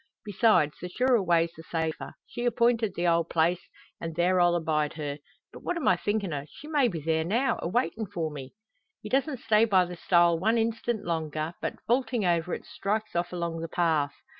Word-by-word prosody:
Besides, 205 -7 +2
the 180 - -5
surer 250 +3 +2
way's 170 -2 +2
the 160 - -10
safer. 160 -1 -4
She 240 - -5
appointed 235 -3 +2
the 175 +1 0
old 170 -1 +2
place, 170 +2 +2 0.4
an' 165 -1 -5
there 180 +2 +2
I'll 175 0 +4
abide 155 -3 0
her. 145 -2 -5 0.3
But - - -9
what 355 - -2
am 330 - -2
I 185 - +6
thinkin' 200 -1 -2
o'? 145 0 -4
She 300 - -12
may 295 -5 +3
be 175 -8 -3
there 160 +1 0
now, 235 +9 0
a - - -2
waitin' 225 +1 -1
for 165 -3 -3
me!" 140 +2 -9 0.5
He - - -6
doesn't 270 -1 0
stay 215 0 +4
by 190 -5 +4
the 175 0 -7
stile 170 -1 +3
one 220 +6 +2
instant 230 0 -1
longer, 160 -1 -2
but, - - -2
vaulting 240 -2 +1
over 170 0 +1
it, - - -10
strikes 215 +1 -3
off 175 +1 -1
along 170 -2 -3
the 165 - -4
path. 160 -4 0
175 Hz, 205 wpm, -28 LUFS, 165-225 Hz, 0.5 s, I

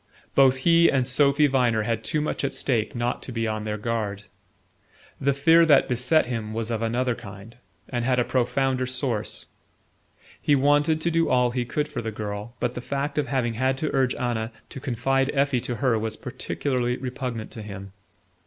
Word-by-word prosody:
Both 135 -1 +5
he 170 0 +6
and 130 -3 +1
Sophy 140 +2 +4
Viner 125 -5 +2
had 115 0 -2
too 155 - 0
much 150 - -2
at 140 - -1
stake 120 -5 0
not 120 +1 -1
to - - -7
be 115 -1 -1
on 110 0 -3
their 105 0 -2
guard. 105 -2 -3 1.0
The 140 - +2
fear 160 +5 +5
that 145 -3 +5
beset 125 +6 +2
him 115 -3 -4
was 115 0 -2
of 115 -1 -2
another 120 +2 0
kind, 100 +1 -11 0.3
and 120 -2 -2
had 125 0 +1
a 125 - +3
profounder 130 +1 0
source. 125 -4 -1 1.0
He 145 - +3
wanted 145 +3 +3
to 170 - +1
do 165 0 +2
all 125 -1 +3
he 125 0 -2
could 150 +5 -2
for 140 -5 -5
the 110 -1 -4
girl, 105 +2 -6
but 125 0 -1
the 125 - -5
fact 140 +3 -2
of 145 - -1
having 125 -4 0
had 130 +3 0
to 155 +2 -2
urge 130 -2 +2
Anna 120 -2 -2 0.2
to - - -7
confide 135 +1 0
Effie 140 -3 +2
to 120 - -3
her 125 -3 +1
was 110 0 -4
peculiarly 125 -3 -2
repugnant 125 -3 -5
to 110 - -7
him. 100 -2 -8
125 Hz, 190 wpm, -25 LUFS, 115-140 Hz, 1.0 s, he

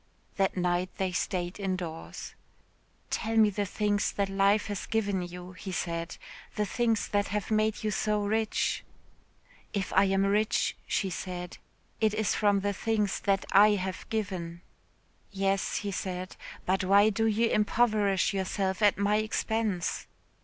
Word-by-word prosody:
That 195 -1 +1
night 180 0 +1
they 190 -1 0
stayed 180 +1 -2
indoors. 185 -4 -4 0.8
"Tell 225 0 -1
me 215 -1 +6
the 205 0 -2
things 205 0 0
that 200 -1 0
life 195 +2 +3
has 205 -2 -4
given 205 -4 0
you," 180 +1 -7
he 190 +1 -7
said, 170 -2 -3 0.4
"the 210 - +1
things 230 0 0
that 205 0 +1
have 210 +2 -3
made 215 0 +1
you 215 - 0
so 210 +1 0
rich." 220 +1 0 0.9
"If 200 -3 -2
I 190 +1 +5
am 195 0 +2
rich," 210 +2 +1
she 195 -3 0
said, 180 0 -5 0.4
"it 215 -1 +2
is 215 -1 +1
from 205 -2 +2
the 205 +1 0
things 210 -1 0
that 195 -1 +1
I 210 +2 +7
have 185 -1 -4
given." 185 -6 -3 0.7
"Yes," 195 0 0
he 200 - -1
said, 185 -1 -4 0.3
"but 190 +1 +1
why 200 +3 +5
do 225 +2 +1
you 225 +2 +2
impoverish 210 -3 +2
yourself 190 0 -1
at 205 -1 +5
my 200 +1 +2
expense?" 215 -3 -1
200 Hz, 150 wpm, -29 LUFS, 185-210 Hz, 0.9 s, I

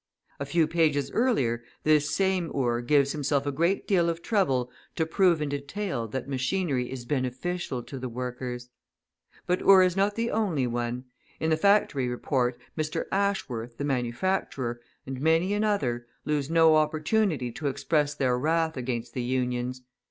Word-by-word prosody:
A 140 - -4
few 165 +1 +3
pages 155 -3 +1
earlier 130 - +1 0.2
this 150 -1 +3
same 190 -3 +1
Ure 120 -3 +1
gives 140 +2 +3
himself 145 -1 0
a 145 - 0
great 170 +7 0
deal 175 -4 +3
of 170 0 -4
trouble 135 - +1 0.2
to 160 - +1
prove 170 -1 +3
in 145 - -2
detail 140 - -3
that 130 +4 -5
machinery 135 -1 -1
is 130 -2 -6
beneficial 130 +2 -2
to 135 - -8
the 130 0 -4
workers! 125 0 -5 0.8
But 180 +1 +1
Ure 195 -1 +7
is 180 -1 +2
not 200 +1 +1
the 230 +1 -1
only 185 -12 0
one; 120 +1 -3 0.3
in 160 - 0
the - - +5
Factory 160 -7 +3
Report, 125 0 -1 0.2
Mr. 155 0 -2
Ashworth, 125 - -1
the 145 - -2
manufacturer, 125 -1 -1 0.2
and 135 -1 -6
many 165 +5 +3
another, 175 - 0 0.2
lose 150 -2 -1
no 165 -1 +5
opportunity 155 - +1
to 145 +5 -4
express 150 +2 0
their 125 -3 +1
wrath 160 +3 +1
against 120 -2 -4
the 125 - -2
Unions. 125 0 -2
145 Hz, 160 wpm, -27 LUFS, 125-170 Hz, 0.8 s, Ure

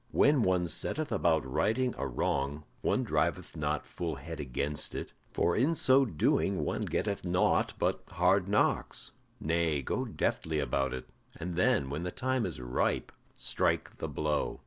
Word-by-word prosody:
When 145 -2 +4
one 90 -4 +2
setteth 155 - -1
about 80 -4 +2
righting 115 - +1
a 70 - -2
wrong, 70 +3 -1 0.2
one - - +1
driveth 80 +5 -1
not 75 -1 -1
full 85 -2 -4
head 75 +4 -7
against 70 +1 -1
it, - - -5 0.2
for 85 - +1
in 145 +9 +2
so 135 -2 +5
doing 90 - +1
one - - -1
getteth 100 -2 -1
naught 90 0 +2
but - - 0
hard 90 +2 +2
knocks. 100 +1 +1 0.3
Nay, 80 -3 +1
go - - -1
deftly 80 -1 -1
about 70 -1 0
it, 65 - -8 0.3
and 85 +1 -5
then, 70 -6 +2
when 75 +3 -3
the 90 - -2
time 130 +2 0
is 85 - -5
ripe, 60 0 -1 0.2
strike - - 0
the - - -3
blow. 75 -1 -1
85 Hz, 160 wpm, -31 LUFS, 75-95 Hz, 0.3 s, so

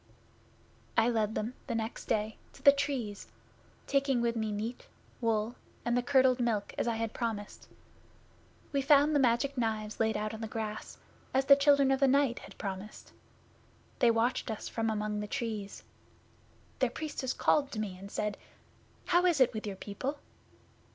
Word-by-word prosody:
'I 230 - +5
led 220 -2 0
them, 225 +4 -2
the 235 - -2
next 225 +1 -3
day, 215 -1 0 0.2
to - - -17
the 280 - +10
Trees, 275 -8 -3 0.6
taking 275 -2 +2
with 235 0 0
me 220 -1 -1
meat, 220 +4 -4 0.3
wool, 225 0 +1 0.3
and 240 +1 +1
curdled 260 -2 +4
milk, 225 -4 0
as - - -1
I 230 - +1
had 225 0 -2
promised. 220 -4 -4 1.0
We 280 -1 +1
found 290 +2 +5
the - - +5
Magic 260 +2 +2
Knives 215 -2 -2
laid 220 0 +2
out 215 +1 -3
on 220 - -7
the 225 - -3
grass, 215 -1 -5 0.4
as 265 0 +3
the 280 0 +9
Children 280 -1 +4
of 270 - +2
the 275 - +5
Night 270 -2 +3
had - - -13
promised. 195 +1 -7 0.9
They 240 - +5
watched 230 +2 +1
us 220 - -4
from 225 -1 -1
among 210 -1 -1
the 210 - -4
Trees. 215 -3 -4 1.0
Their - - +3
Priestess 290 -4 -4
called 285 -2 +2
to 215 - -4
me 205 -4 -3
and 195 +2 -10
said, 210 0 -3 0.7
"How 350 +1 +3
is 335 -5 +2
it 260 - +5
with 215 -1 -4
your 200 - -4
people?" 235 +9 -4
230 Hz, 170 wpm, -31 LUFS, 215-270 Hz, 1.0 s, the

